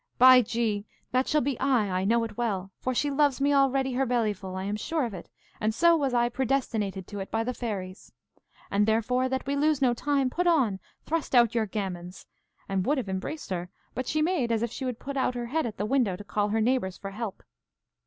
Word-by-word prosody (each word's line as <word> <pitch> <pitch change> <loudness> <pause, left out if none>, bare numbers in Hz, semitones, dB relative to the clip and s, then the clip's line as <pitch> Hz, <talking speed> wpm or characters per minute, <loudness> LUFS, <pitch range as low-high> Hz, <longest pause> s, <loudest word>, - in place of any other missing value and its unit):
By 255 0 +9
G, 220 -3 -1 0.2
that 255 +1 +1
shall 300 - +2
be 270 -1 -2
I, 255 -6 +2
I 190 - -1
know 230 +3 +3
it 225 -2 -5
well; 195 -5 -2
for 255 0 -2
she 290 +3 +1
loves 285 -1 +2
me 285 +1 +2
already 270 -1 +2
her 265 +2 +1
bellyful, 210 -6 -1
I 190 - -3
am 205 +2 -2
sure 300 +7 -1
of 230 - -5
it, 180 - -9 0.3
and 215 0 0
so 340 +3 +5
was 280 -4 0
I 240 -1 +3
predestinated 235 -6 -1
to 205 +1 -7
it 195 - -5
by 225 0 0
the 250 +2 -2
fairies. 200 -5 -5 0.6
And 205 +1 +2
therefore, 250 +4 +1
that 265 0 -2
we 280 +1 -1
lose 300 0 +2
no 255 -3 +3
time, 275 +1 0
put 355 +5 0
on, 255 - +3 0.3
thrust 320 -4 -1
out 235 -1 +5
your 225 -2 +1
gammons! 185 -3 -5 0.4
and 195 -1 0
would 290 +8 +1
have 245 -7 -3
embraced 190 +9 -4
her, 180 -1 -3 0.2
but 255 +1 -4
she 310 0 +1
made 310 -9 +1
as 225 0 +1
if 235 - -2
she 265 - -5
would 250 -3 -3
put 275 +2 -6
out 255 -1 +1
her 240 -1 -3
head 295 +4 -1
at 215 - -7
the 205 - -1
window 235 -5 +1
to 205 - -9
call 205 0 -1
her 220 +1 +1
neighbours 220 -6 0
for 195 - -7
help. 215 -1 -6
240 Hz, 230 wpm, -27 LUFS, 205-270 Hz, 0.6 s, By